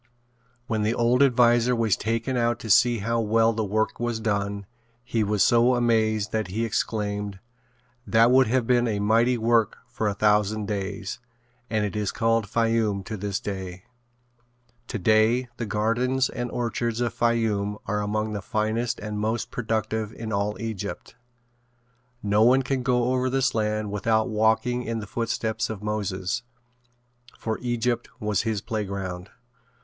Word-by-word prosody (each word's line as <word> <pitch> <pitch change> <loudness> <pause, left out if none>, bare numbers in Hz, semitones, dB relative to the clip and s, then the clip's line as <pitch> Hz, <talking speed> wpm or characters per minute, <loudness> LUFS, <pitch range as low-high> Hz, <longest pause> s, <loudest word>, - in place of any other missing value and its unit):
When 110 -3 -1
the 110 +2 +1
old 120 +2 +2
adviser 120 -2 +4
was 115 -3 +2
taken 115 +4 -2
out 120 -1 +1
to 110 - -2
see 120 +4 +5
how 115 0 +1
well 115 +1 +3
the 110 0 -1
work 110 +2 -1
was 120 -1 -1
done, 100 -2 -2 0.4
he 115 -2 0
was 105 -1 +2
so 120 +2 +4
amazed 110 -3 +1
that 110 -2 -1
he 110 +5 -2
exclaimed: 105 -2 -2 0.7
"That 115 +2 +5
would 130 -1 +5
have 125 +1 +1
been 120 0 +3
a 105 -2 -1
mighty 115 +4 +3
work 115 -1 +2
for 110 - -2
a 100 - -1
thousand 105 0 +2
days," 100 0 -4 0.5
and 110 -2 0
it 105 - -4
is 105 -2 -1
called 115 -2 +1
Fayoum 115 -3 +1
to 110 - -5
this 100 0 -3
day. 95 -2 -6 1.0
Today 110 +3 +2
the 115 - -3
gardens 120 +6 +1
and 120 0 -4
orchards 115 -1 -2
of 120 -2 -1
Fayoum 110 -3 0
are 105 0 -1
among 105 +1 -2
the 105 - -3
finest 110 +2 -1
and 105 0 -4
most 110 +3 -2
productive 110 -2 -2
in 110 -1 -6
all 100 +1 -1
Egypt. 110 -2 -5 1.1
No 105 +1 +2
one 130 +4 +5
can 130 0 -1
go 125 0 +1
over 130 0 +1
this 135 0 +1
land 105 -1 -1
without 110 +2 +1
walking 110 +3 +1
in 115 -2 -3
the 110 - -5
footsteps 110 +1 -2
of 105 -2 -6
Moses, 105 0 -2 1.0
for 110 -1 -3
Egypt 120 -1 -1
was 105 -3 0
his 110 -3 -2
playground. 95 -4 -4
110 Hz, 155 wpm, -25 LUFS, 105-120 Hz, 1.1 s, see